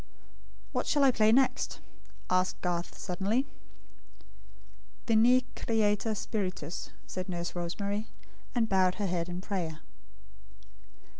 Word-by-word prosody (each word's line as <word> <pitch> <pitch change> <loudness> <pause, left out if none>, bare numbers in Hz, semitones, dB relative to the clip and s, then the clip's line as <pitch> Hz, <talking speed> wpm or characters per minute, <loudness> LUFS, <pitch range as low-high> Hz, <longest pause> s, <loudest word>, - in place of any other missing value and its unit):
"What - - -1
shall 290 -2 +3
I 270 - +7
play 215 -2 +4
next?" 260 +3 +2 0.5
asked 185 0 +1
Garth, 175 -1 -2
suddenly. 200 +8 0 1.6
"Veni, 245 +3 +5
Creator 220 -1 +1
Spiritus," 185 -7 -3 0.2
said 185 0 -5
Nurse 175 -1 -3
Rosemary; 200 +5 -2 0.5
and 230 -2 +3
bowed 185 -2 +3
her 210 - -2
head 175 -2 -1
in 175 +1 -4
prayer. 170 -6 -3
200 Hz, 105 wpm, -30 LUFS, 180-225 Hz, 1.6 s, I